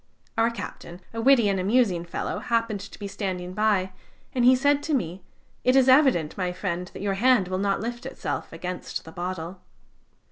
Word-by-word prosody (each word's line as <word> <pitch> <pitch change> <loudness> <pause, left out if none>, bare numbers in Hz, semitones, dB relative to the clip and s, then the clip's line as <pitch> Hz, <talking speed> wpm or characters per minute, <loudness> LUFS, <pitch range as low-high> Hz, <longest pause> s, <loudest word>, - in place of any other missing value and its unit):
Our 225 +1 +3
captain, 180 -6 -8
a 230 - -3
witty 245 -3 +5
and 195 -1 +1
amusing 190 -3 +2
fellow, 170 - -3
happened 230 -3 0
to 200 - -10
be 205 - -5
standing 185 -3 -4
by, 200 -2 +1 0.4
and 250 - +1
he 255 +1 +7
said 285 +2 +2
to 305 0 0
me: 180 -5 -3 0.4
'It 255 +1 +4
is 265 -1 +5
evident, 260 - +4
my 180 -2 -1
friend, 180 -1 -3
that - - -6
your 200 -1 0
hand 215 -2 +3
will 185 0 -1
not 200 0 0
lift 240 +2 -5
itself - - -4
against 180 0 -5
the 160 - -10
bottle.' 180 +1 -5
200 Hz, 185 wpm, -25 LUFS, 180-240 Hz, 0.4 s, he